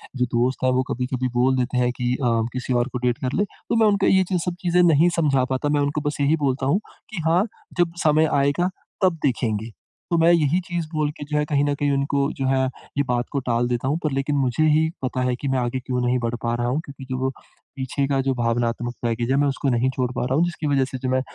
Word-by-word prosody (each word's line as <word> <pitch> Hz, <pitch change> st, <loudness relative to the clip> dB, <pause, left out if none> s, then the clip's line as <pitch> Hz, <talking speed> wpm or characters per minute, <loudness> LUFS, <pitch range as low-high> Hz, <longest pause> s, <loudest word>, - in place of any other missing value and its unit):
जो 125 Hz, -1 st, +1 dB
दोस्त 125 Hz, +2 st, 0 dB
हैं, 130 Hz, -, +3 dB
वो 130 Hz, +1 st, +2 dB
कभी-कभी 125 Hz, +1 st, -2 dB
बोल 125 Hz, +2 st, +3 dB
देते 125 Hz, 0 st, -1 dB
हैं 125 Hz, 0 st, +2 dB
कि 125 Hz, 0 st, 0 dB
अ, -, -, +2 dB, 0.3 s
किसी 130 Hz, 0 st, -2 dB
और, 120 Hz, +1 st, +2 dB
को 125 Hz, -, -4 dB
डेट 125 Hz, -1 st, 0 dB
कर 130 Hz, +1 st, -3 dB
ले। 205 Hz, -, +3 dB, 0.3 s
तो -, -, +1 dB
मैं 225 Hz, -1 st, +5 dB
उनको 200 Hz, -1 st, +2 dB
ये 190 Hz, 0 st, +5 dB, 0.2 s
सब 180 Hz, -1 st, -2 dB
चीज़ें 180 Hz, 0 st, +3 dB
नहीं 165 Hz, 0 st, +5 dB
समझा 140 Hz, -5 st, +3 dB
पाता। 130 Hz, +3 st, -1 dB
मैं 145 Hz, 0 st, +2 dB
उनको 145 Hz, +1 st, -1 dB
बस 145 Hz, -, -6 dB
यही 145 Hz, +3 st, +3 dB
बोलता 130 Hz, 0 st, 0 dB
हूँ 145 Hz, +9 st, +2 dB, 0.3 s
कि 195 Hz, -7 st, -5 dB
हाँ, 170 Hz, +4 st, +4 dB, 0.3 s
जब 175 Hz, -1 st, +2 dB
समय 155 Hz, 0 st, +4 dB
आएगा, 145 Hz, +6 st, +2 dB, 0.3 s
तब 180 Hz, -3 st, +3 dB
देखेंगे। 115 Hz, -4 st, -1 dB, 0.4 s
तो 170 Hz, -, +3 dB
मैं 165 Hz, +1 st, +5 dB
यही 165 Hz, 0 st, +3 dB
चीज़ 175 Hz, -3 st, -3 dB
बोल 155 Hz, -1 st, +1 dB
के -, -, -6 dB
जो 150 Hz, +1 st, -2 dB
है 150 Hz, -, +2 dB
कहीं 145 Hz, -1 st, +1 dB
न 145 Hz, -, +1 dB
कहीं 145 Hz, 0 st, 0 dB
उनको 140 Hz, 0 st, 0 dB
जो 135 Hz, -, 0 dB
है 130 Hz, 0 st, +2 dB, 0.3 s
ये 140 Hz, -, +3 dB
बात 120 Hz, 0 st, -1 dB
को 140 Hz, -, 0 dB
टाल 120 Hz, 0 st, +1 dB
देता 125 Hz, +1 st, -1 dB
हूँ, 150 Hz, -, +1 dB
पर 155 Hz, -, 0 dB
लेकिन 135 Hz, +2 st, -1 dB
मुझे 130 Hz, +2 st, +1 dB
ही 155 Hz, +1 st, +3 dB
पता 130 Hz, 0 st, -1 dB
है 125 Hz, -, 0 dB
कि 140 Hz, -, -5 dB
मैं 135 Hz, -1 st, +1 dB
आगे 125 Hz, +1 st, -1 dB
क्यों 125 Hz, -1 st, -2 dB
नहीं 125 Hz, +1 st, +2 dB
बढ़ 120 Hz, 0 st, -2 dB
पा 120 Hz, 0 st, 0 dB
रहा 120 Hz, 0 st, -1 dB
हूँ 130 Hz, +5 st, 0 dB
क्योंकि 135 Hz, -1 st, -10 dB
जो 130 Hz, -, -2 dB
वो 130 Hz, +1 st, 0 dB, 0.5 s
पीछे 135 Hz, +1 st, -2 dB
का 135 Hz, -1 st, +1 dB
जो 135 Hz, 0 st, 0 dB
भावनात्मक 120 Hz, 0 st, -1 dB
बैगेज 120 Hz, +1 st, -1 dB
है 135 Hz, -, +3 dB
मैं 145 Hz, -, +3 dB
उसको 140 Hz, 0 st, -1 dB
नहीं 125 Hz, +1 st, +2 dB
छोड़ 125 Hz, -1 st, -1 dB
पा -, -, -1 dB
रहा 130 Hz, +1 st, 0 dB
हूँ। 165 Hz, +4 st, +3 dB
जिसकी 170 Hz, -3 st, -3 dB
वजह 140 Hz, -2 st, +2 dB
से 130 Hz, 0 st, -6 dB
जो 130 Hz, 0 st, -3 dB
मैं 130 Hz, 0 st, +2 dB
135 Hz, 265 wpm, -23 LUFS, 125-150 Hz, 0.5 s, मैं